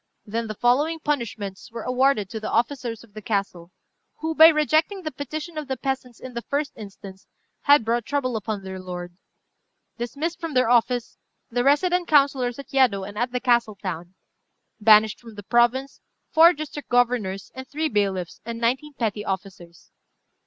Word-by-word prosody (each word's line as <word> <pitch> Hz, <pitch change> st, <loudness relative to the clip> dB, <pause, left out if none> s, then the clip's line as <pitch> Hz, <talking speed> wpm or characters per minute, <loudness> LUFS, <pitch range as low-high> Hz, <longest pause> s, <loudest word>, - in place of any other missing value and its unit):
Then 225 Hz, +2 st, -3 dB
the 215 Hz, -, -5 dB
following 290 Hz, +9 st, +2 dB
punishments 230 Hz, -11 st, -3 dB
were 230 Hz, -1 st, -6 dB
awarded 250 Hz, -4 st, +2 dB
to 220 Hz, -, -4 dB
the 215 Hz, -, -4 dB
officers 235 Hz, -2 st, -1 dB
of 220 Hz, -3 st, -20 dB
the 215 Hz, -, -8 dB
castle, 195 Hz, -5 st, -2 dB, 0.5 s
who, 320 Hz, 0 st, -3 dB
by 320 Hz, 0 st, +9 dB
rejecting 315 Hz, +5 st, +2 dB
the 310 Hz, -, -3 dB
petition 305 Hz, +4 st, -5 dB
of 300 Hz, -, -7 dB
the 265 Hz, -1 st, -2 dB
peasants 260 Hz, -2 st, -4 dB
in 255 Hz, -1 st, -9 dB
the 235 Hz, -, -4 dB
first 285 Hz, +3 st, -2 dB
instance, 195 Hz, -2 st, -11 dB, 0.4 s
had 285 Hz, -5 st, +6 dB
brought 235 Hz, +1 st, +1 dB
trouble 255 Hz, -1 st, -1 dB
upon 215 Hz, -2 st, -3 dB
their 190 Hz, 0 st, -6 dB
lord: 175 Hz, -1 st, -7 dB, 0.8 s
"Dismissed 300 Hz, +8 st, -3 dB
from 330 Hz, -5 st, -5 dB
their 255 Hz, -2 st, +3 dB
office, 245 Hz, 0 st, +1 dB, 0.3 s
the 245 Hz, +1 st, +1 dB
resident 350 Hz, +6 st, +2 dB
councillors 275 Hz, -5 st, +3 dB
at 280 Hz, -, -11 dB
Yedo 245 Hz, -8 st, +3 dB
and 205 Hz, +2 st, -8 dB
at 240 Hz, +3 st, -1 dB
the 250 Hz, -, -1 dB
castle 240 Hz, -4 st, +2 dB
town. 180 Hz, -2 st, -6 dB, 0.6 s
"Banished 215 Hz, 0 st, +5 dB
from 230 Hz, -3 st, -13 dB
the 205 Hz, -, -9 dB
province, 240 Hz, +5 st, +1 dB, 0.3 s
four 330 Hz, +2 st, +8 dB
district 295 Hz, -1 st, -7 dB
governors, 240 Hz, -6 st, +1 dB
and 260 Hz, 0 st, -8 dB
three 310 Hz, +3 st, -1 dB
bailiffs, 195 Hz, -, -1 dB
and 230 Hz, 0 st, -5 dB
nineteen 265 Hz, +5 st, -1 dB
petty 215 Hz, -4 st, -2 dB
officers. 190 Hz, -3 st, -7 dB
240 Hz, 170 wpm, -24 LUFS, 210-280 Hz, 0.8 s, by